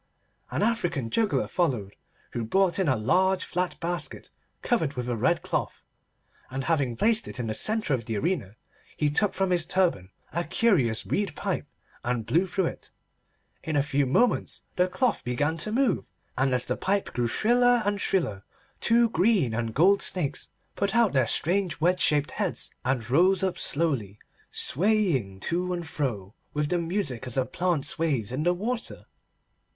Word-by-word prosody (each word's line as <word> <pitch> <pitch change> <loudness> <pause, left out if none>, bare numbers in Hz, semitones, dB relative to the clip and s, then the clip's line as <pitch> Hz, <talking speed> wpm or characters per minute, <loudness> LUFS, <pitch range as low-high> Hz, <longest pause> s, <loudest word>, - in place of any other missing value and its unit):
An - - -1
African 175 - 0
juggler 220 -3 +1
followed, 125 - -1 0.4
who 120 - -3
brought 190 - +2
in 190 - +1
a 130 - +3
large 185 - +2
flat 180 0 -2
basket 175 +1 -3 0.3
covered 165 - +1
with 125 -1 -3
a 120 - -1
red 110 - +1
cloth, - - -3 0.7
and 135 +1 -4
having 140 -7 0
placed 220 - +2
it - - -6
in 120 - -2
the 110 - -2
centre 215 - +1
of 120 -4 -1
the 110 -2 -2
arena, 110 - -2 0.4
he 150 -1 +1
took 205 +7 +1
from 190 0 0
his 175 -2 +2
turban 170 - 0 0.2
a 170 +2 0
curious 155 - +2
reed 195 -7 -1
pipe, - - -3 0.4
and 120 -2 -1
blew 165 +12 +2
through 185 +1 0
it. - - -6 0.7
In 155 +1 -2
a 145 - +3
few 140 -1 +1
moments 235 - +1
the 180 0 +3
cloth 240 +5 0
began 145 +6 0
to 190 +7 -1
move, 260 +2 +1 0.3
and 130 +1 +1
as 125 -1 +1
the - - -1
pipe 200 +1 -1
grew 120 -1 0
shriller 245 - +3
and 205 0 0
shriller 110 - 0 0.4
two 235 0 +4
green 180 - +2
and 115 0 -2
gold 195 +6 +5
snakes 165 -7 -1 0.3
put 200 +2 -1
out 235 -6 +4
their 130 -4 +3
strange 180 - +1
wedge 180 +3 +2
shaped 145 -1 +2
heads - - -2
and 125 -3 -1
rose 185 +7 +4 0.2
slowly 135 - 0
up, - - -26 0.2
swaying 165 - +1
to 180 +2 -1
and 175 -2 -4
fro 110 -11 -3 0.2
with 150 0 0
the 175 - +1
music 165 - -2
as 125 - -1
a 130 - +2
plant 175 -4 -1
sways 140 -10 -1
in 130 +3 -2
the 175 +3 +3
water. 230 +6 -3
165 Hz, 175 wpm, -27 LUFS, 125-195 Hz, 0.7 s, gold